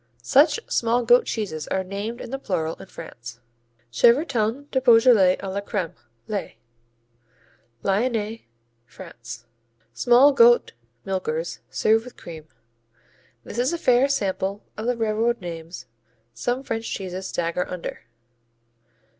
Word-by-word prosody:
Such 290 - +4
small 235 +1 +1
goat 245 +2 +5
cheeses 185 -9 -3
are 190 - -1
named 200 +5 -5
in - - -8
the 270 - -3
plural 165 -9 -2
in - - -11
France. 120 -10 -10 0.5
Chevretons 240 - +2
du 260 - +1
Beaujolais 230 -6 +6
à 195 -1 -6
la 200 - -2
crème, 180 -4 -3 0.3
les 200 - -4 1.3
Lyonnais, 220 - -1 0.4
France 115 -1 -10 0.5
Small 245 - +5
goat 240 -2 +5 0.3
milkers 170 -4 -3
served 220 +1 +2
with 250 - -12
cream. 160 -2 -10 1.0
This 230 - -6
is 255 +7 +1
a - - -1
fair 255 -3 +3
sample 200 -5 -1
of 220 +2 -5
the 245 -1 0
railroad 225 +2 0
names 165 -5 -8 0.5
some 245 - -2
French 225 -3 -4
cheeses 190 0 -5
stagger 170 +1 -2
under. 180 -2 -6
215 Hz, 125 wpm, -24 LUFS, 180-240 Hz, 1.3 s, Beaujolais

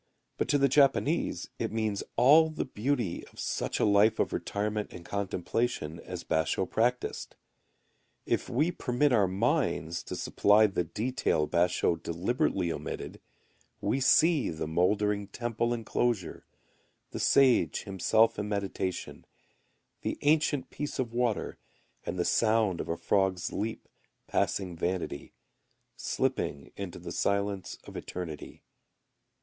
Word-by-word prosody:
But - - +1
to 145 - +3
the 140 0 +4
Japanese 140 +4 +2
it - - -2
means 110 -2 -1
all 150 +7 +6
the 155 - -3
beauty 120 -6 -2
of - - -16
such - - -2
a - - +3
life 105 +2 +4
of - - 0
retirement 105 +1 -2
and 85 -1 -10
contemplation 95 -3 -2
as - - -7
Basho[u] 80 +4 0
practised. 125 +5 -1 0.9
If - - -1
we 150 +8 +1
permit 140 -3 +1
our 105 -5 +4
minds 95 - 0
to - - -5
supply 105 +2 +4
the 95 -4 0
detail 105 - -1
Basho[u] 85 -1 +1
deliberately 90 0 0
omitted, - - -6 0.6
we 135 - 0
see 155 +2 +4
the 80 -1 -4
mouldering 100 +5 +1
temple 120 +1 -2
enclosure, 115 -5 -1 0.6
the - - -5
sage 135 -3 +4
himself 110 +3 +2
in 105 0 -3
meditation, 100 -3 -3 0.8
the - - -2
ancient 145 -3 +2
piece 145 0 -4
of 120 -3 -2
water, 120 -3 -1 0.5
and 90 - -3
the 90 - 0
sound 110 -5 +2
of - - -7
a 85 - -1
frog's 95 -2 0
leap 110 +2 -4 0.4
passing 95 -3 -1
vanity 90 +2 -3 0.6
slipping 70 0 -2
into 100 -3 -6
the 85 0 -7
silence 100 0 -1
of - - -12
eternity. 85 -5 -7
105 Hz, 130 wpm, -29 LUFS, 90-125 Hz, 0.9 s, all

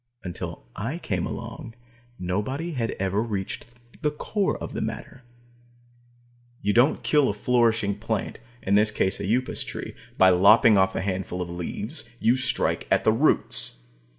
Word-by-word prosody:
Until 90 -8 -6
I - - -3
came - - -2
along, 115 - -7 0.4
nobody 105 - -2
had 120 -6 -2
ever 95 +2 0
reached 105 -3 -4 0.3
the 150 - +2
core 195 +7 -1
of - - -7
the - - -3
matter. 130 - -5 1.4
You 105 +1 +2
don't 125 +6 +3
kill 150 -3 +3
a 100 - -2
flourishing 115 -3 +1
plant 110 -1 -3 0.2
in 100 - 0
this 105 +1 +5
case 95 -2 0
an - - -3
Upas 130 +2 0
Tree - - -6 0.2
by 95 0 +7
lopping 105 +5 +6
off 95 -1 +3
a - - -1
handful 95 -1 -3
of 90 -1 -4
leaves. 110 - -5
You 120 - +3
strike 130 -1 0
at - - +3
the 110 - +5
roots. 110 - +1
105 Hz, 155 wpm, -25 LUFS, 95-125 Hz, 1.4 s, by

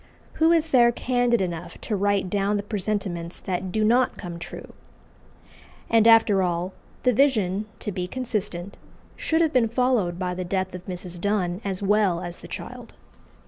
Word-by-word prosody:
Who 325 +1 +6
is 325 -1 +2
there 240 -2 +6
candid 245 -2 +1
enough 175 -2 -4
to 215 - -2
write 200 -1 +1
down 200 +2 0
the 200 - -3
presentiments 195 -5 -3
that 185 0 -3
do 215 +3 0
not 240 +4 +3
come 175 -3 -7
true? - - -9 1.2
And 225 -1 +5
after 225 -4 +6
all, 180 +1 -1 0.3
the 250 - +4
vision, 215 -6 +2
to 210 - -3
be 180 -1 -3
consistent, 205 -6 -4 0.4
should 320 +1 0
have 320 -2 +2
been 235 -3 +3
followed 235 -8 +1
by 180 -1 -2
the 185 +1 -4
death 185 +1 -2
of 180 0 -9
Mrs. 180 -1 -5
Donne 195 -2 0
as 195 -1 -3
well 200 -3 +2
as 175 -1 -6
the - - -10
child. - - -8
200 Hz, 170 wpm, -25 LUFS, 180-230 Hz, 1.2 s, Who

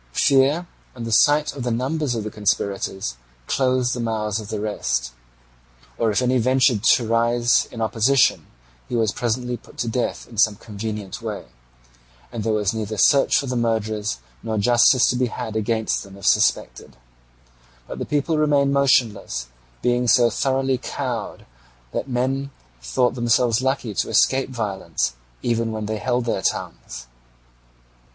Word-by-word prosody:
Fear, 140 +5 +3 0.3
and 120 -2 -6
the 115 - -4
sight 145 +6 +3
of 140 - -6
the 120 - -2
numbers 130 +3 -1
of 110 - -3
the 110 - -5
conspirators, 100 - -2 0.3
closed 130 - +1
the 125 - -4
mouths 110 -2 -1
of 105 - -8
the 110 - -4
rest; 65 - -2 0.9
or 115 - +2
if 110 +4 +1
any 125 0 +2
ventured 125 -2 +2
to 120 -3 -3
rise 120 +1 +2
in 115 - -7
opposition, 115 +5 +2 0.4
he - - -2
was 110 -3 +2
presently 125 +2 -2
put - - -19
to 120 - -2
death 120 +2 -2
in 115 -3 -7
some 110 -2 +4
convenient 105 +1 -6
way, 110 -3 -5 0.9
and 115 -3 -4
there 110 - 0
was 105 -2 0
neither 110 -1 -4
search 140 +6 +4
for 140 - 0
the 130 -1 -3
murderers 110 - -1 0.2
nor 110 -1 -3
justice 120 +3 +4
to - - -2
be 125 0 +1
had 110 -1 -6
against 110 0 0
them 100 0 -12
if 100 - -9
suspected; - - +1 0.9
but - - -7
the - - -2
people 150 +2 0
remained 145 -2 +2
motionless, 115 - +1 0.3
being 125 0 +1
so 120 0 +5
thoroughly 135 -1 0
cowed - - -5 0.5
that - - -4
men 130 +2 -1 0.3
thought 125 - +1
themselves 120 -1 +2
lucky 130 -4 -1
to - - -1
escape 135 0 +2
violence, 105 - -2 0.3
even 115 -1 0
when 110 -1 -4
they 110 +1 -3
held 125 +2 -1
their 115 - -1
tongues. 60 +1 -4
120 Hz, 160 wpm, -22 LUFS, 110-130 Hz, 0.9 s, so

